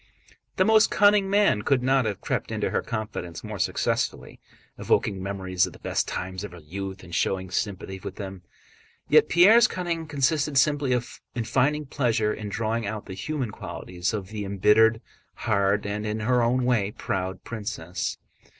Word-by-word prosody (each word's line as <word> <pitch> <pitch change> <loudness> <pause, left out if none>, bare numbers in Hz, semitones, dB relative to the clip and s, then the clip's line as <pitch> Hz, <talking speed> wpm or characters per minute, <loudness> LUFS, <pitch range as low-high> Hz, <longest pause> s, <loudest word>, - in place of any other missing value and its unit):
The - - +3
most 220 0 +5
cunning 205 -1 +4
man 200 - +3
could 130 +3 +1
not 135 -1 +3
have 105 -3 -3
crept - - -2
into - - -1
her - - +1
confidence 105 -7 -5
more - - -6
successfully, - - -1 0.4
evoking 100 -3 +1
memories 95 -2 0
of - - -10
the - - -13
best - - -1
times 95 +1 -4
of 105 - -7
her - - -10
youth 95 +4 -7
and 85 -1 -12
showing 95 +1 -1
sympathy 95 -1 -3
with - - -7
them. 95 -2 -7 0.7
Yet - - +5
Pierre's 210 +7 +7
cunning 170 -3 -3
consisted 145 0 +1
simply 140 -2 +3 0.4
in 120 - -1
finding 145 +6 +1
pleasure 115 -5 0
in 105 -1 -6
drawing 110 +1 -2
out 105 0 -5
the 95 - -7
human 130 +4 -3
qualities 90 -3 -4
of 100 -4 -4
the 105 -1 -5
embittered, 105 +3 +4 0.3
hard, 100 -2 +1
and 105 +1 -3
(in 110 0 -2
her 125 +3 +2
own 125 +2 +2
way) 115 -6 +2
proud 95 -1 -3
princess. 105 -6 -4
110 Hz, 170 wpm, -25 LUFS, 95-130 Hz, 0.7 s, Pierre's